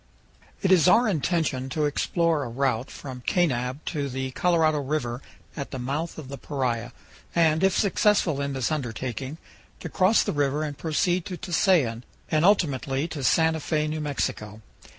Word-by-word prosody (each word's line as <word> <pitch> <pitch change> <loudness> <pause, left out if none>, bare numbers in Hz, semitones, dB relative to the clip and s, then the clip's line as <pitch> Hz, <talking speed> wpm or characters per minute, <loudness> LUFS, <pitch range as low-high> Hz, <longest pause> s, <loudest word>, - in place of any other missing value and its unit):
IT 190 - +2
IS 180 -2 +6
our 235 +6 +5
intention 155 -7 0
to 150 +3 0
explore 160 +1 +1
a 125 - -5
route 130 0 -1
from 130 -3 -8
Kanab 130 -5 0
to 145 -4 -2
the 130 0 -3
Colorado 160 -1 +2
River 135 -4 -2 0.3
at 140 - -5
the - - -6
mouth 140 +7 -3
of 155 -4 -8
the 140 +1 -8
Paria, 125 -4 -2 0.4
and, 160 0 +3
if 190 -1 +3
successful 200 -7 +2
in 140 0 -2
this 130 0 -1
undertaking, 130 0 -4 0.4
to - - -6
cross 190 +4 +3
the - - -2
river 145 +1 0
and 150 -2 -4
proceed 175 +4 0
to 180 - -5
Tusayan, 165 - +1 0.3
and 155 0 +2
ultimately 145 - +2
to 145 -4 -5
Santa 160 +3 +3
Fe, 155 0 -1
New 155 0 -3
Mexico. 110 -7 -3
150 Hz, 165 wpm, -25 LUFS, 130-165 Hz, 0.4 s, IS